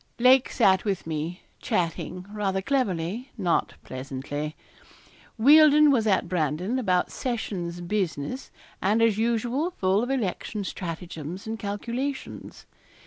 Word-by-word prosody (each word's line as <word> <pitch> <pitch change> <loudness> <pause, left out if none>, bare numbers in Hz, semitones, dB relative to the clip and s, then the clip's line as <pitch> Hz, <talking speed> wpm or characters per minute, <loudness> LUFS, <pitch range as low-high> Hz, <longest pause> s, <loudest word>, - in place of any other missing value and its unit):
Lake 255 +1 +5
sat 190 -5 +3
with 200 -4 -2
me 160 +2 -4 0.2
chatting, 180 +1 -2
rather 200 -2 -1
cleverly, 210 -1 -1
not 180 -5 0
pleasantly. 140 +3 -5 0.8
Wealdon 300 +4 +7
was 230 -5 +2
at 190 -3 +2
Brandon 180 - -1
about 185 -7 +1
sessions 185 -9 -3
business, 180 - -2 0.3
and 210 +4 +2
as 220 -2 +3
usual 235 +7 0
full 195 - +1
of 245 - -2
election 215 -4 -2
stratagems 170 -1 -6
and 220 0 -4
calculations. 235 +7 -5
200 Hz, 115 wpm, -26 LUFS, 175-240 Hz, 0.8 s, Wealdon